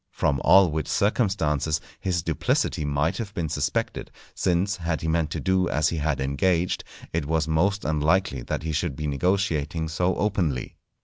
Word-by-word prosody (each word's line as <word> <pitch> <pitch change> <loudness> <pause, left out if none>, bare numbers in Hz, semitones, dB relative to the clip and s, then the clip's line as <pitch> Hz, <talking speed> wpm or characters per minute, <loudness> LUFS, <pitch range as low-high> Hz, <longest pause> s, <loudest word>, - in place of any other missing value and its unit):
From 70 -3 0
all 95 -4 +6
which 80 0 -2
circumstances 80 - +1 0.2
his 90 -4 -1
duplicity 80 -1 0
might 75 +6 0
have 100 -3 -5
been 80 -3 -2
suspected, 75 -1 -2 0.2
since, 95 +2 0
had 85 -2 -2
he 80 - -3
meant 80 -1 +1
to - - -3
do 95 -1 +1
as 75 +1 +2
he 85 - -3
had 75 -2 0
engaged, 85 +7 0 0.3
it 80 -3 -1
was 80 -1 +1
most 95 +6 +1
unlikely 80 -1 +1
that - - -4
he 80 - -2
should 80 -1 -1
be 75 - -4
negotiating 80 0 0
so 90 +4 0
openly. 90 - -1
80 Hz, 170 wpm, -25 LUFS, 75-95 Hz, 0.3 s, all